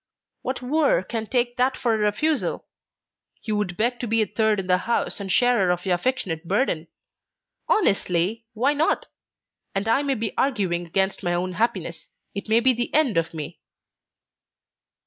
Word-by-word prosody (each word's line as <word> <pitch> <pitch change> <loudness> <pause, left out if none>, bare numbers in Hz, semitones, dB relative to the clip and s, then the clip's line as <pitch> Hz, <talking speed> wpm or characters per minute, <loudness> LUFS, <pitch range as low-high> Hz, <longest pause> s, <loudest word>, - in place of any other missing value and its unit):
"What 260 0 -4
wooer 280 -6 +2
would 225 -2 -3
take 245 -1 0
that 255 +1 +2
for 235 -2 +1
a - - +1
refusal? 255 +9 0 0.7
He 220 - -5
would 210 -4 -1
beg 240 +3 0
to 240 - -3
be 225 0 +3
a - - -1
third 215 0 +1
in 190 - -3
the 180 0 +3
house 235 +1 -1
and 195 -1 -4
sharer 245 -6 +3
of 180 +1 -1
your 185 - +2
affectionate 175 -5 -2
burden. 185 -6 0 0.8
Honestly, 205 - +1
why 260 +6 +2
not? 300 +2 0 0.7
And 195 +2 -1
I 230 +5 +3
may 280 -2 0
be 220 -2 -3
arguing 190 -10 0
against 190 +3 0
my 175 -2 0
own 180 +1 -2
happiness; 225 +7 -2 0.2
it 200 +2 -6
may 225 +2 +4
be 260 +1 +5
the 240 0 -2
end 295 -8 +3
of 165 0 +1
me!" 160 0 -7
220 Hz, 170 wpm, -24 LUFS, 185-245 Hz, 0.8 s, be